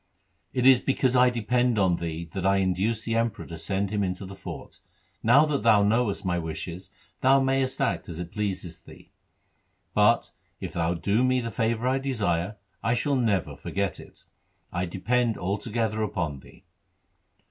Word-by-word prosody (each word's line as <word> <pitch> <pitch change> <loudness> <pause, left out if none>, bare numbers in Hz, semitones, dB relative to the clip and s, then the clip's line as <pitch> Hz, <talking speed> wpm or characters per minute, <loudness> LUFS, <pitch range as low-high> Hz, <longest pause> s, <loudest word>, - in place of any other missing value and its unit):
It 125 -1 0
is 130 -2 +8
because 130 -1 +1
I 125 0 +6
depend 120 0 +1
on 95 -4 +3
thee 85 0 -4
that 95 - -3
I 95 +1 +3
induced 95 +4 0
the 115 - -1
Emperor 115 -1 -1
to 85 - -8
send 95 +4 -2
him 105 -1 0
into 90 +1 -3
the 95 +1 -9
fort. 95 - -9 0.4
Now 125 +7 +6
that 150 -5 -1
thou 105 -2 +5
knowest 105 -1 +1
my 90 -1 0
wishes, 85 +3 -6 0.3
thou 135 +1 +5
mayest 135 0 0
act - - -1
as 80 - -6
it 85 0 -6
pleaseth 95 -5 -4
thee, - - -15 0.8
but, - - +3 0.3
if - - -6
thou 85 0 0
do 100 +8 +1
me 130 0 +3
the 115 -1 -4
favour 115 +2 0
I 130 +1 +2
desire, 105 -7 -1 0.2
I 115 +2 +1
shall 140 +3 0
never 100 - 0
forget 95 +8 -3
it. - - -15 0.5
I 90 +1 -1
depend 115 +6 0
altogether 110 +3 -2
upon 85 -9 -2
thee.' - - -18
105 Hz, 170 wpm, -26 LUFS, 90-125 Hz, 0.8 s, is